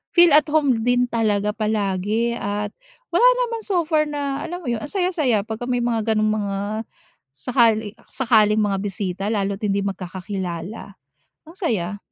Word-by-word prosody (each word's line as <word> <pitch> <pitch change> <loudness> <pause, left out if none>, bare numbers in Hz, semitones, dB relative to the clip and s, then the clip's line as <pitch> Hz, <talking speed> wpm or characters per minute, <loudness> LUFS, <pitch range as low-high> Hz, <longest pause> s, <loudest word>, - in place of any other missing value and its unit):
feel 345 -3 +7
at 300 +2 +6
home 280 -7 +2
din 245 +1 +2
talaga 210 -3 0
palagi. 215 +1 0
At 205 -2 -3 0.4
wala 480 +8 +6 0.2
naman 460 -1 -5
so 365 -6 0
far 305 -2 +1
na 285 -1 -3
alam 355 -1 -6
mo - - -6
yun? 225 -2 -2
Ang 290 - -5
saya, 370 -2 0
saya 245 - +1
pagka 225 +3 -5
may 245 - +1
mga 225 -2 +1
gano'ng 215 0 +2
mga 200 -1 -2 0.8
sakali 220 - +2 0.2
sakaling 220 -5 +3
mga 200 -2 +1
bisita 195 -2 -3
lalo't 200 -2 -1
hindi 200 -1 0
magkakakilala, 185 0 -5 0.5
ang 330 +4 -14
saya. 205 - -1
220 Hz, 160 wpm, -22 LUFS, 200-275 Hz, 0.8 s, feel